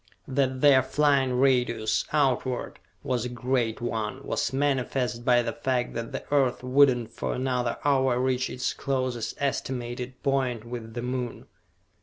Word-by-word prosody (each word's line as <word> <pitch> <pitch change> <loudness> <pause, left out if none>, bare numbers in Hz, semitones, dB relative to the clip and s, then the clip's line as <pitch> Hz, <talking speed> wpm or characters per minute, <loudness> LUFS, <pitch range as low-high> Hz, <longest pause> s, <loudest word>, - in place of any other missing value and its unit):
That 130 -1 0
their 140 -3 +7
flying 135 -1 +2
radius, 120 -5 +2
outward, 130 -4 0 0.2
was 125 -3 -1
a 125 - -3
great 120 -2 -1
one, 120 +2 -3
was - - -1
manifest 130 -3 0
by 120 -1 +4
the - - -3
fact 130 -4 -1
that 115 0 -4
the - - -5
Earth 130 -3 +2
would 130 0 +5
not 115 -2 -7
for - - -3
another 125 -2 -1
hour 130 -3 +3
reach 130 0 0
its 125 - -2
closest 130 -4 -2
estimated 125 -2 -3
point 130 -5 0
with 115 -1 -7
the 120 - -3
Moon. 125 -1 -4
125 Hz, 150 wpm, -27 LUFS, 120-135 Hz, 0.2 s, their